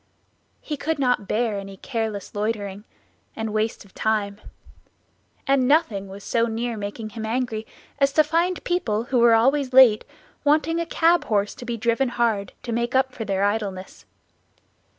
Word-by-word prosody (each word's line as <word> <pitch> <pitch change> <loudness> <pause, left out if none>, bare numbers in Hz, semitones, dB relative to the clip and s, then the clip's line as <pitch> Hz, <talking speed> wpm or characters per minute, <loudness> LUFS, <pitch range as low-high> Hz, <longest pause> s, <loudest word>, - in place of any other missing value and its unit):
He 300 - -4
could 315 +3 -1
not 250 -7 +1
bear 215 -1 0
any 195 0 -9
careless 220 -3 -4
loitering 205 -1 -3 0.5
and 220 -1 -4
waste 215 0 -1
of 190 - -21
time; 210 -2 -1 1.0
and 270 -2 +3
nothing 235 -10 +2
was 195 +1 -10
so 230 0 +1
near 230 +1 -2
making 210 +1 -5
him 225 -1 -6
angry 225 -1 -2 0.3
as 275 0 +3
to 310 - +5
find 340 +4 0
people, 230 -12 0
who 245 +1 0
were 235 -1 +6
always 265 +3 +2
late, 250 -5 +7 0.4
wanting 315 +3 +2
a 335 - -2
cab 335 -1 +3
horse 205 -1 0
to 245 - -10
be 240 -1 -3
driven 235 +3 +1
hard, 225 -5 0
to 240 - -4
make 235 +2 -1
up 265 0 +3
for 225 -3 -6
their 195 -1 0
idleness. 200 -2 -3
230 Hz, 165 wpm, -23 LUFS, 210-265 Hz, 1.0 s, late